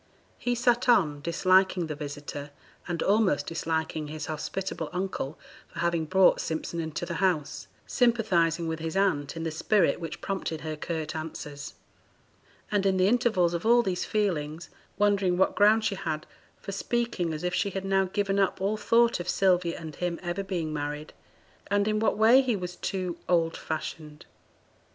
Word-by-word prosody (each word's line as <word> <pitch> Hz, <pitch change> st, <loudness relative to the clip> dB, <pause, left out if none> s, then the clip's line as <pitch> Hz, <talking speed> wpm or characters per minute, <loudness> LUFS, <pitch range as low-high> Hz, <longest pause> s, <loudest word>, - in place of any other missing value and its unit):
He 245 Hz, 0 st, 0 dB
sat 240 Hz, +1 st, +2 dB
on, 155 Hz, -11 st, +3 dB
disliking 185 Hz, +2 st, +3 dB
the 155 Hz, -, -4 dB
visitor, 145 Hz, 0 st, -6 dB, 0.4 s
and 175 Hz, -2 st, -2 dB
almost 195 Hz, -8 st, +2 dB
disliking 160 Hz, -2 st, -2 dB
his 155 Hz, +1 st, -5 dB
hospitable 160 Hz, +1 st, -4 dB
uncle 180 Hz, -5 st, -3 dB, 0.3 s
for -, -, -16 dB
having 170 Hz, -1 st, 0 dB
brought 190 Hz, +4 st, +4 dB
Simpson 160 Hz, +1 st, -3 dB
into 160 Hz, +1 st, -3 dB
the 170 Hz, -, -4 dB
house, 175 Hz, -7 st, 0 dB, 0.2 s
sympathizing 180 Hz, -9 st, +2 dB
with 160 Hz, 0 st, -3 dB
his 160 Hz, +3 st, -3 dB
aunt 165 Hz, -7 st, +1 dB
in 165 Hz, -, -4 dB
the 165 Hz, -, -2 dB
spirit 195 Hz, +6 st, +2 dB
which 165 Hz, -3 st, -6 dB
prompted 190 Hz, -5 st, -3 dB
her 155 Hz, 0 st, -4 dB
curt 160 Hz, 0 st, -4 dB
answers, 150 Hz, -2 st, -6 dB, 1.0 s
and 200 Hz, -2 st, +2 dB
in 190 Hz, -1 st, +2 dB
the 185 Hz, 0 st, +4 dB
intervals 215 Hz, -7 st, +2 dB
of 170 Hz, -, -2 dB
all 240 Hz, +2 st, +5 dB
these 185 Hz, -3 st, -1 dB
feelings 170 Hz, -7 st, -2 dB, 0.3 s
wondering 200 Hz, -3 st, +2 dB
what 190 Hz, -, +3 dB
ground 215 Hz, +2 st, +5 dB
she 215 Hz, -, +1 dB
had 160 Hz, -6 st, -3 dB, 0.3 s
for 195 Hz, -, -7 dB
speaking 200 Hz, -4 st, -1 dB
as 155 Hz, +1 st, -5 dB
if 180 Hz, 0 st, -1 dB
she 200 Hz, -, +1 dB
had 195 Hz, 0 st, -4 dB
now 195 Hz, 0 st, +2 dB
given 200 Hz, +1 st, 0 dB
up 195 Hz, -1 st, +1 dB
all 200 Hz, +3 st, 0 dB
thought 230 Hz, +2 st, +3 dB
of 175 Hz, -, -4 dB
Sylvia 180 Hz, -3 st, +2 dB
and 160 Hz, -3 st, -8 dB
him 175 Hz, -1 st, -2 dB
ever 175 Hz, +2 st, -2 dB
being 170 Hz, -5 st, -3 dB
married, 150 Hz, +1 st, -4 dB, 0.5 s
and 205 Hz, 0 st, +1 dB
in 215 Hz, 0 st, +1 dB
what 220 Hz, -, +1 dB
way 230 Hz, +5 st, +7 dB
he 250 Hz, -4 st, 0 dB
was 180 Hz, -2 st, -5 dB
too 185 Hz, -3 st, -3 dB
'old 165 Hz, -2 st, +2 dB
fashioned.' 155 Hz, -1 st, -6 dB
180 Hz, 170 wpm, -27 LUFS, 160-200 Hz, 1.0 s, way